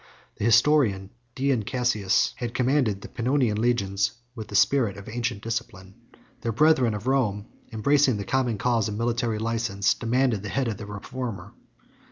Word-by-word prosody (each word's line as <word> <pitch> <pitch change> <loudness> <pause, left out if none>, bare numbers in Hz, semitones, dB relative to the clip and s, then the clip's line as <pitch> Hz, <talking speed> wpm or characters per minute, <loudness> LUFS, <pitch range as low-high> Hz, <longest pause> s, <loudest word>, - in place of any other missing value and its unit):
The - - -2
historian 115 -5 +3 0.2
Dion 135 -3 +1
Cassius 110 -3 +1
had 120 -1 -5
commanded 125 -6 +1
the - - -8
Pannonian 120 -3 0
legions 100 -5 0 0.2
with 110 -4 -8
the 105 - -7
spirit 115 -2 +3
of 100 - -11
ancient 115 -2 -3
discipline. 115 -5 -5 0.5
Their 115 - -1
brethren 130 -3 +3
of 105 +2 -7
Rome, 115 -7 0 0.3
embracing 135 +2 +2
the 100 - -5
common 125 -3 0
cause 115 -1 +1
of 105 - -4
military 115 -1 -1
license, 110 -3 0
demanded 120 -2 0
the 105 - -6
head 135 +2 -1
of 110 -3 -3
the 105 - -8
reformer. 115 +2 -6
115 Hz, 160 wpm, -25 LUFS, 105-125 Hz, 0.5 s, historian